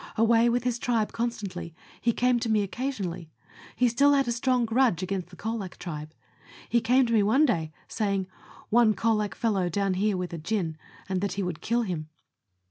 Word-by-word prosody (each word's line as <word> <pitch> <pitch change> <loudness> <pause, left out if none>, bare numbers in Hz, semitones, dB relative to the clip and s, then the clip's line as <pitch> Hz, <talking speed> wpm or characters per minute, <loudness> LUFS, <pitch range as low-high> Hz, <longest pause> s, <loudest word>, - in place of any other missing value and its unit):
Away 230 +1 +4
with 245 +1 +1
his 245 -1 -1
tribe 230 -4 0
constantly, 200 -8 -4 0.3
he 235 - +3
came 245 +1 +2
to 230 - -2
me 215 -2 +3
occasionally; 195 - -4 0.5
he 250 - +3
still 280 +5 +4
had 275 -2 +2
a - - +1
strong 245 +1 +1
grudge 225 -6 +2
against 185 -1 -3
the 180 - -13
Colac 215 -2 -4
tribe; 155 -3 -7 0.5
he 235 - +2
came 250 +3 +4
to 230 - -1
me 220 - +5
one 225 +9 +4
day 165 - 0 0.2
saying, 200 -3 -1 0.3
" - - -21
One 225 -2 +5
Colac 215 -2 0
fellow 200 -6 0
down 195 +2 0
here 200 +1 +1
with 180 -1 -4
a 165 - -4
gin," 165 -2 -2 0.3
and 190 -2 -1
that 200 -2 -1
he 200 0 -2
would 180 -3 -4
kill 235 +1 +1
him. 165 -7 -4
215 Hz, 200 wpm, -27 LUFS, 185-235 Hz, 0.5 s, me